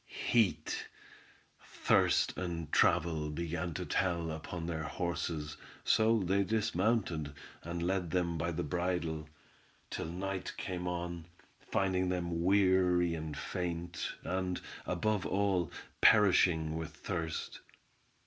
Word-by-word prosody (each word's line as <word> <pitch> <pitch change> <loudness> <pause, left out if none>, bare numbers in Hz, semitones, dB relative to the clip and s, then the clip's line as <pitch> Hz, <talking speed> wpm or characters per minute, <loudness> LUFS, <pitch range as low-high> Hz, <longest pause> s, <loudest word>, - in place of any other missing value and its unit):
Heat, 90 -10 +1 0.8
thirst, - - +2
and 85 -3 -4
travel 80 -2 +3
began 85 +1 -3
to - - -3
tell 85 -3 0
upon 80 +2 -5
their 80 -2 -2
horses, 80 -2 -3 0.3
so 115 +1 +4
they 95 +2 +2
dismounted, 95 -6 0 0.3
and 85 0 -4
led 90 -1 0
them 85 0 0
by 85 +1 -1
the 80 - -2
bridle, 85 -1 -2 0.6
till - - -3
night 95 +2 -3
came 90 -1 -3
on, 85 -1 -3 0.3
finding 95 -1 0
them 85 -2 -1
weary 90 -2 +4
and 80 -3 -4
faint, 85 -1 -3
and, 90 -1 -1 0.3
above 100 +2 0
all, 95 -4 +1 0.3
perishing 90 -6 +5
with 80 -1 -5
thirst. 80 -3 -4
85 Hz, 110 wpm, -33 LUFS, 80-95 Hz, 0.8 s, perishing